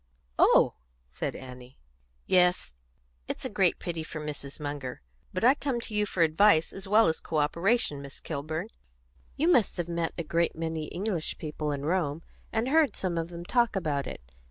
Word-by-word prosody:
"Oh!" - - +6 0.3
said - - -4
Annie. 125 -1 -11 0.5
"Yes; 180 - +3 0.5
it's - - -5
a - - -3
great - - +3
pity 170 -2 -4
for 155 0 -6
Mrs. 145 -2 -6
Munger. 145 - -5 0.3
But 185 - -3
I 250 +3 +7
come 275 -4 -2
to 220 - -6
you 210 0 +1
for 180 -3 +2
advice 165 +1 +4
as 195 0 -7
well 215 +3 +6
as 160 - +1
co 160 - -3
operation, 170 +1 +1
Miss 140 0 -9
Kilburn. 160 +5 -4 0.7
You 315 - +2
must 245 - +4
have 175 -1 -2
met 170 -1 -2
a 170 - -2
great 170 +2 0
many 160 -1 -3
English 180 -1 -3
people 150 -1 -3
in 140 0 -3
Rome, 165 -2 0 0.3
and 225 +3 0
heard 310 0 +4
some 185 -3 -2
of 165 -1 -1
them 170 0 -8
talk 235 +1 +2
about 150 -7 -1
it. - - -7
165 Hz, 180 wpm, -28 LUFS, 150-195 Hz, 0.7 s, I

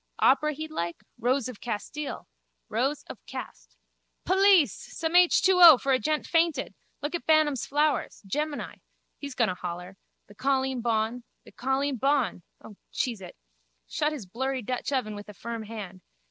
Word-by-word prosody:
Opera 300 +3 +3
he'd 310 +2 -7
like? 170 - -4 0.2
Rose 255 +2 +1
of 250 -5 -9
Castile. 240 +6 -5 0.4
Rows 270 +6 -1
of - - -11
cast. - - -9 0.5
Police! 380 -3 +5
Some 320 0 -5
H2O 355 -3 +7
for 275 - -1
a 255 - +3
gent 305 +1 -1
fainted. 330 -5 +1 0.3
Look 290 - -2
at 345 - -4
Bantam's 310 -4 +3
flowers. 295 -3 0
Gemini. 295 +8 -3 0.4
He's 280 -2 -7
going 235 -5 +2
to - - -1
holler. 180 +1 -7 0.3
The 205 - -16
colleen 265 +1 0
bawn. 230 +1 0 0.2
My - - -14
colleen 270 +1 0
bawn. 270 -5 +1 0.2
O, 210 - -12
cheese 235 -6 -2
it! 180 - -10 0.5
Shut 300 - -1
his 285 -9 -6
blurry 260 +6 -3
Dutch 250 +5 -3
oven 250 -6 -1
with 205 0 -9
a 210 - -10
firm 230 +1 -5
hand. 200 -4 -8
265 Hz, 160 wpm, -27 LUFS, 220-300 Hz, 0.5 s, H2O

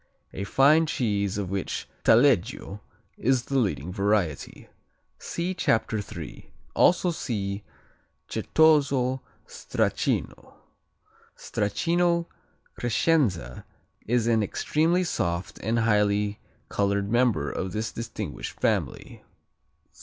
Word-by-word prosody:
A 100 - -4
fine 150 - +4
cheese 100 -7 -1
of 95 -3 -3
which 100 -2 -3 0.2
Taleggio 115 -4 +3 0.4
is 130 0 +2
the 135 -1 0
leading 90 - -1
variety. 100 -6 -1 0.5
See 170 +1 -3
in - - -5
Chapter 110 -9 +1
3. 85 -6 -9 0.2
Also 180 0 +4
see 100 -10 -3 0.7
Certoso 135 -5 +2 0.2
Stracchino. - - -2 0.8
Stracchino 170 - 0 0.5
Crescenza 110 - 0 0.4
is 120 0 +2
an 115 -1 +3
extremely 160 - +1
soft 85 - -2
and 115 +1 0
highly 105 -2 +1 0.3
colored 100 0 0
member 120 - +2
of 95 0 -4
this 110 +3 -3
distinguished 115 0 -6
family. - - -2
110 Hz, 95 wpm, -26 LUFS, 100-135 Hz, 0.8 s, fine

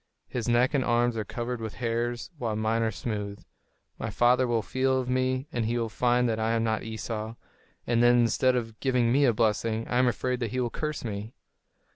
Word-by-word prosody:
His 120 -2 -3
neck 120 +4 +3
and 135 -3 +2
arms 120 0 +2
are 110 - -1
covered 120 +3 -4
with 110 -1 -5
hairs, 120 +2 -2
while 115 -3 -1
mine 110 +1 0
are 115 - +2
smooth. 105 -3 -5 0.5
My - - -3
father 125 +1 +3
will 115 -2 +1
feel 130 +2 +1
of 125 - -3
me, 130 +1 0
and 115 -2 0
he 120 +1 0
will 115 -1 -1
find 125 +2 +2
that 110 -1 -1
I 110 +1 +1
am 115 -1 +1
not 110 -1 0
Esau; 110 0 -5 0.5
and 120 -1 +2
then, 120 0 +6
instead 125 +2 +3
of 115 -3 -3
giving 125 -3 +2
me 140 +3 +4
a 125 - +5
blessing, 110 0 0
I 125 - +1
am 130 - +4
afraid 125 +1 -1
that 120 -3 -2
he 130 - -2
will 120 -2 -1
curse 150 -4 -4
me." 105 +1 -5
120 Hz, 215 wpm, -27 LUFS, 115-125 Hz, 0.5 s, then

